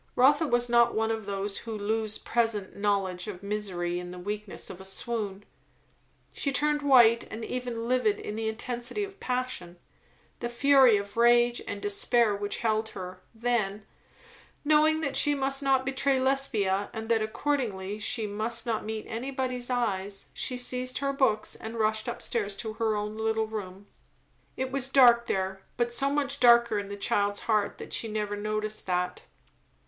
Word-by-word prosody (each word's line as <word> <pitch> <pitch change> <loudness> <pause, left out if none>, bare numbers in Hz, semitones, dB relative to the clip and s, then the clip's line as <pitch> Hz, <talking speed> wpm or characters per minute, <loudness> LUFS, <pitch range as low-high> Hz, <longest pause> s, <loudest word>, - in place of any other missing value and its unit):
Rotha 290 +5 +4
was 240 -1 +2
not 235 0 +4
one 220 +1 +1
of 220 -2 -4
those 200 0 -2
who 225 -2 -6
lose 215 +1 -1
present 225 -5 0
knowledge 195 -3 -1
of 195 -2 -7
misery 185 -4 -2
in 180 0 -7
the 180 - -8
weakness 205 +2 -5
of 185 - -10
a - - -9
swoon. 205 0 -3 0.9
She 280 - -1
turned 295 +2 +1
white 240 -5 +6
and 225 0 -6
even 245 -2 -4
livid 240 -5 +2
in 210 - -5
the 220 0 -2
intensity 240 - -3
of 400 0 -8
passion, 250 -9 -3 0.6
the 240 - -3
fury 260 -2 +5
of 200 +1 -6
rage 240 0 +4
and 205 - -4
despair 210 +2 +2
which 205 0 -2
held 220 0 +1
her; 185 -2 -8
then, 220 -4 -1 0.8
knowing 310 +1 +4
that 280 -3 -2
she 290 0 +4
must 270 0 0
not 265 -1 +2
betray 270 0 +1
Lesbia 220 -8 +1
and 220 0 -5
that 225 -1 +3
accordingly 215 -5 -2
she 220 +1 -1
must 215 +4 -2
not 225 -2 -1
meet 220 0 -5
anybody's 255 +1 -2
eyes, 200 -5 -2
she 250 - -3
seized 250 0 -1
her 275 0 -1
books 220 -6 +1
and 225 +1 -7
rushed 220 +1 0
up 240 - -6
stairs 205 -4 -2
to 220 -2 -4
her 220 -1 0
own 210 +1 -3
little 220 0 +1
room. 200 -3 -7 0.7
It 260 0 -2
was 270 -1 0
dark 240 -3 +6
there, 190 0 -2 0.2
but 240 0 +1
so 270 +3 +2
much 285 -1 -1
darker 235 -3 +5
in 200 - -5
the 200 0 -6
child's 205 0 0
heart 215 -3 0
that - - -9
she 230 - -1
never 210 -1 -2
noticed 215 0 -3
that. 180 - -1
225 Hz, 170 wpm, -28 LUFS, 205-250 Hz, 0.9 s, white